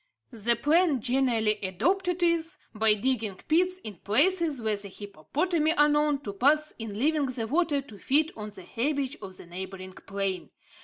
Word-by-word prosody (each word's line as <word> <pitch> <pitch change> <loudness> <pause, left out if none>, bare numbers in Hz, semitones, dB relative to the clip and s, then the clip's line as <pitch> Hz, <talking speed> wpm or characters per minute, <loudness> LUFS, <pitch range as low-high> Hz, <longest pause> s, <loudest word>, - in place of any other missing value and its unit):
The 235 0 +1
plan 300 +3 +3
generally 235 -3 +1
adopted 355 - 0
is, 335 +1 +1 0.2
by 220 -1 +3
digging 220 -3 0
pits 360 +3 +2
in 210 -4 -7
places 305 - +2
where 220 -2 0
the 200 0 -5
hippopotami 300 - -1
are 295 -3 +4
known 295 -1 +1
to 205 -7 -6
pass 300 +8 +2
in 220 -3 -6
leaving 295 +3 +1
the 245 -3 -3
water 295 +2 +1
to 215 -7 -13
feed 305 +4 +2
on 210 -1 -6
the 190 -3 -12
herbage 280 - -2
of 190 -1 -9
the - - -10
neighbouring 185 +1 -8
plain. 195 -1 -4
255 Hz, 165 wpm, -27 LUFS, 210-310 Hz, 0.2 s, are